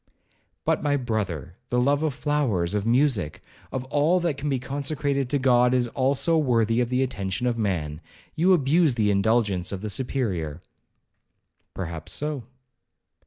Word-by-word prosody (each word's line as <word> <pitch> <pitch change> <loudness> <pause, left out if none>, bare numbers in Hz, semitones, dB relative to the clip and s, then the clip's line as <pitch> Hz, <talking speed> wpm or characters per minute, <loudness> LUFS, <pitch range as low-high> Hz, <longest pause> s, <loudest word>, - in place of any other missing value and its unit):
'But, - - +1
my 145 -1 +1
brother, 95 - -3
the 125 - +1
love 140 +4 +2
of 155 -4 -1
flowers, 120 - 0
of 105 +1 -1
music, 115 - +2 0.3
of 130 - -3
all 155 +5 +3
that 170 -4 0
can 145 +1 -3
be 135 - +1
consecrated 140 0 -2
to 145 - +2
God, 125 -1 +4
is 120 -1 +1
also 140 +6 +1
worthy 115 -4 +2
of 120 - -1
the 130 +1 +2
attention 100 -2 -3
of 120 -1 +1
man—you 95 - -2
abuse 155 -3 +3
the 105 -3 +2
indulgence 100 -3 +1
of 95 -2 -4
the 105 - -2
Superior.' 95 - -2 1.1
'Perhaps 85 -4 -5
so.' 150 -5 -2
125 Hz, 150 wpm, -25 LUFS, 100-140 Hz, 1.1 s, God